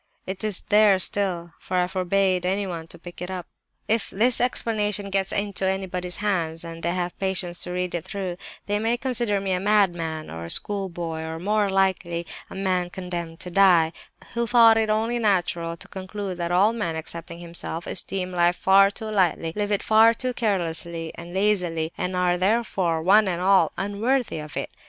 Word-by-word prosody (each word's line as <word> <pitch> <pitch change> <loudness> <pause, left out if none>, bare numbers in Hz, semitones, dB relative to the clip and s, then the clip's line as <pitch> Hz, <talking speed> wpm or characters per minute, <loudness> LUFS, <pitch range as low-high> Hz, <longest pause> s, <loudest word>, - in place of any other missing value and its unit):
It 190 +2 -6
is 215 -3 0
there 210 -2 +6
still, 180 -3 -2
for 185 - -3
I 180 - +3
forbade 185 0 +1
anyone 180 -3 -2
to - - -8
pick 175 +1 -11
it 180 - -4
up. 185 -2 -5 0.4
"If 225 0 0
this 235 +5 +2
'Explanation' 210 -5 0
gets 195 0 0
into 200 -1 -1
anybody's 185 -2 -2
hands, 170 -6 -1
and 165 0 -8
they 170 +2 -1
have 175 -1 -3
patience 185 -3 0
to 180 - 0
read 180 0 -2
it 170 -2 -2
through, 185 -2 -4 0.3
they 205 0 0
may 225 +2 +1
consider 240 -5 0
me 195 -1 -2
a 180 - +1
madman, 175 -6 +1
or 80 0 -6
a - - -8
schoolboy, 175 - -2
or, 160 0 -5
more 205 +3 +1
likely, 190 -3 0 0.2
a - - -9
man 185 -2 0
condemned 175 -3 -6
to 180 - -7
die, 175 -4 +5 0.4
who 235 0 -1
thought 230 -1 +7
it 220 -1 +1
only 225 +3 0
natural 175 -5 0
to - - -11
conclude 190 -1 -6
that 170 0 -2
all 195 +5 +4
men, 210 -8 -2
excepting 170 +1 -7
himself, 170 0 -5
esteem 185 0 -2
life 175 0 +2
far 195 +1 +5
too 220 +2 -7
lightly, 175 -5 +1
live 205 0 -2
it 205 - +1
far 225 +1 +5
too 255 +1 -3
carelessly 170 -7 +1
and 170 +1 -10
lazily, 180 -5 +1
and 180 0 -3
are, 180 -1 +1
therefore, 185 -5 +1
one 205 +4 +5
and 175 -2 -1
all, 190 +1 +4
unworthy 215 +2 -1
of 150 -1 -8
it. - - -3
185 Hz, 185 wpm, -24 LUFS, 175-205 Hz, 0.4 s, thought